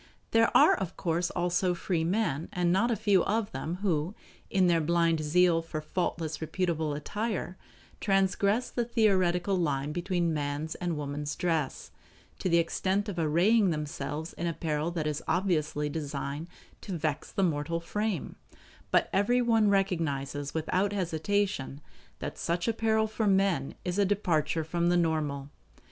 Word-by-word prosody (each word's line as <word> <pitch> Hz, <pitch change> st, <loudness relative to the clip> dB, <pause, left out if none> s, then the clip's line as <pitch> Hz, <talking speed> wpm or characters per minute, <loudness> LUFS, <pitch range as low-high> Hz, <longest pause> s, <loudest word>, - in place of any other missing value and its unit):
There 225 Hz, 0 st, +4 dB
are -, -, +7 dB
of 190 Hz, -4 st, -3 dB
course 170 Hz, -1 st, 0 dB
also 175 Hz, +1 st, 0 dB
free 170 Hz, -2 st, -1 dB
men, 170 Hz, -4 st, 0 dB
and 175 Hz, -1 st, +1 dB
not 225 Hz, +6 st, +2 dB
a 235 Hz, -, +2 dB
few 195 Hz, -3 st, +3 dB
of 215 Hz, 0 st, 0 dB
them, 155 Hz, +6 st, -3 dB
who, 175 Hz, 0 st, 0 dB, 0.3 s
in 190 Hz, -2 st, +3 dB
their 170 Hz, -2 st, +3 dB
blind 165 Hz, 0 st, +2 dB
zeal 165 Hz, +2 st, +3 dB
for 165 Hz, -1 st, -5 dB
faultless 160 Hz, 0 st, -3 dB
reputable 160 Hz, -3 st, -1 dB
attire, 205 Hz, +4 st, -3 dB, 0.4 s
transgress 200 Hz, +3 st, +1 dB
the 240 Hz, -, 0 dB
theoretical 195 Hz, -5 st, +2 dB
line 145 Hz, -5 st, 0 dB
between 175 Hz, 0 st, 0 dB
man's 145 Hz, +1 st, -2 dB
and 175 Hz, -3 st, -3 dB
woman's 145 Hz, 0 st, -4 dB
dress, 165 Hz, -6 st, -1 dB, 0.5 s
to 185 Hz, -, -1 dB
the 170 Hz, -, +4 dB
extent 190 Hz, +4 st, 0 dB
of 180 Hz, -4 st, -4 dB
arraying 180 Hz, +7 st, +3 dB
themselves 150 Hz, 0 st, -4 dB
in 170 Hz, -, -3 dB
apparel 155 Hz, -1 st, -1 dB
that 170 Hz, -3 st, -3 dB
is 150 Hz, -1 st, -2 dB
obviously 160 Hz, -4 st, 0 dB
designed 145 Hz, 0 st, -4 dB, 0.3 s
to 190 Hz, -4 st, -4 dB
vex 155 Hz, -2 st, -2 dB
the 195 Hz, -, 0 dB
mortal 165 Hz, -1 st, 0 dB
frame; 205 Hz, +1 st, -3 dB, 0.5 s
but -, -, +3 dB
everyone 225 Hz, +1 st, +3 dB
recognizes 145 Hz, -8 st, -1 dB
without 185 Hz, +5 st, 0 dB
hesitation 185 Hz, -4 st, -1 dB, 0.4 s
that -, -, -6 dB
such 170 Hz, +3 st, -1 dB
apparel 220 Hz, -1 st, +2 dB
for 220 Hz, 0 st, -1 dB
men 190 Hz, -8 st, +2 dB
is 180 Hz, +2 st, -1 dB
a 200 Hz, -, +4 dB
departure 170 Hz, -5 st, +1 dB
from 170 Hz, +2 st, 0 dB
the 175 Hz, -, +3 dB
normal. 150 Hz, -4 st, -1 dB
175 Hz, 150 wpm, -29 LUFS, 155-195 Hz, 0.5 s, are